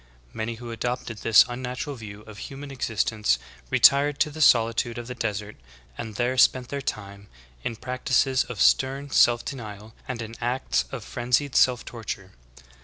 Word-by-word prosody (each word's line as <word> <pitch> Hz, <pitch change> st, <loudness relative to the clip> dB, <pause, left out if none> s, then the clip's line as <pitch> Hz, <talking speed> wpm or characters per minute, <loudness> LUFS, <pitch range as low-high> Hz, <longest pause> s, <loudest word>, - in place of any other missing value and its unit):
Many 110 Hz, +1 st, -3 dB
who 120 Hz, +1 st, -8 dB
adopted 120 Hz, -1 st, -4 dB
this 110 Hz, 0 st, +6 dB
unnatural 125 Hz, +3 st, -5 dB
view 105 Hz, -3 st, -9 dB
of 105 Hz, -1 st, -12 dB
human 140 Hz, +3 st, -8 dB
existence 110 Hz, -, 0 dB, 0.3 s
retired 140 Hz, +1 st, +5 dB
to 150 Hz, -, +2 dB
the 155 Hz, +2 st, -6 dB
solitude 115 Hz, -2 st, +3 dB
of 120 Hz, -, -5 dB
the 125 Hz, -, -6 dB
desert, 105 Hz, -3 st, -4 dB, 0.4 s
and 110 Hz, -3 st, -7 dB
there 125 Hz, +3 st, 0 dB
spent 125 Hz, 0 st, +4 dB
their 140 Hz, 0 st, -3 dB
time 100 Hz, -4 st, -6 dB, 0.4 s
in 115 Hz, -, -3 dB
practices 130 Hz, +2 st, +1 dB
of 125 Hz, -5 st, -7 dB
stern 135 Hz, +5 st, +2 dB
self 120 Hz, -2 st, +4 dB
denial 110 Hz, -4 st, -7 dB
and 130 Hz, -3 st, -4 dB
in 115 Hz, 0 st, -8 dB
acts 120 Hz, -, 0 dB
of -, -, -6 dB
frenzied 125 Hz, +3 st, -1 dB
self 125 Hz, -1 st, +4 dB
torture. 100 Hz, -5 st, -7 dB
120 Hz, 160 wpm, -25 LUFS, 110-130 Hz, 0.4 s, this